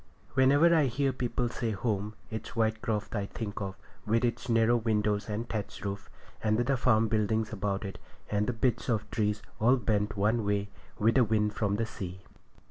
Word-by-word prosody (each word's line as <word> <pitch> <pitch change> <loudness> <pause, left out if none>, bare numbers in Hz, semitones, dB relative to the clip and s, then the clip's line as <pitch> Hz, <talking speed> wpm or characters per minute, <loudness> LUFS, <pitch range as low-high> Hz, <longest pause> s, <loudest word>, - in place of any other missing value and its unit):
Whenever 145 +6 +5
I 155 -3 +5
hear 135 +2 0
people 125 0 -1
say 115 -2 -2
'home,' 105 0 -2 0.2
it's 110 +1 -6
Whitecroft 110 -1 0
I 100 -1 -1
think 105 -1 -5
of, 95 -1 -4 0.3
with 115 +3 +2
its 120 +1 -2
narrow 115 +1 +4
windows 105 -2 0
and 110 +3 -3
thatch 105 -2 -5
roof 100 0 -4 0.3
and 110 -1 +2
the 125 +3 +2
farm 115 -3 +3
buildings 110 0 0
about 100 0 -2
it, 95 - -6 0.3
and 105 0 0
the 125 - 0
bits 120 +2 0
of 110 -3 0
trees 105 -2 0 0.2
all 120 +4 +5
bent 105 -2 0
one 110 +3 +2
way 100 0 0 0.3
with 110 +2 +3
the 130 - +5
wind 105 -1 +1
from 100 -1 0
the 115 +2 0
sea. 95 -4 -7
110 Hz, 185 wpm, -30 LUFS, 105-120 Hz, 0.3 s, Whenever